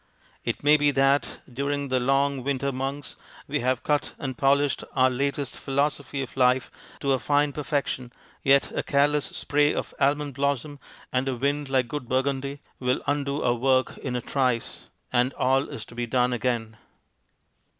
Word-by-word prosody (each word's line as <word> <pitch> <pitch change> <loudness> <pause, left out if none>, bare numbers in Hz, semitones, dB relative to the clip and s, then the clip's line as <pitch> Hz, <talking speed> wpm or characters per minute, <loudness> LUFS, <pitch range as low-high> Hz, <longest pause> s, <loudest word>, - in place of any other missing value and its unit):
It - - -3
may 150 +1 +6
be 145 -1 +3
that 135 0 +2
during 140 +2 -2
the 130 0 +2
long 135 +1 +1
winter 140 0 -1
months 135 +2 -4 0.3
we - - -1
have 130 0 0
cut 150 -1 0
and 130 -2 -4
polished 140 +2 +2
our 130 -1 +4
latest 140 +1 -2
philosophy 140 0 -1
of 130 - -10
life 130 -1 +3 0.3
to 140 -1 +2
a 130 - +1
fine 145 +1 +2
perfection, 140 -4 -2 0.3
yet 140 0 +4
a - - +1
careless 145 +1 +2
spray 145 0 +1
of - - -4
almond 145 0 +1
blossom 140 +1 -1 0.3
and 130 +1 +1
a 130 - -1
wind 140 +2 -1
like 130 -2 +2
good 125 -1 -5
Bur 130 +1 +2
gundy 140 +1 -3 0.2
will 125 0 0
undo 145 0 -1
our 120 - +3
work 130 +2 +2
in 130 -3 -4
a 125 - -1
trice, 125 -2 -1 0.3
and 125 +2 +2
all 135 +2 +2
is 110 - -6
to - - -14
be 120 0 -3
done 125 +1 +2
again. 115 -2 -2
135 Hz, 170 wpm, -26 LUFS, 130-140 Hz, 0.3 s, may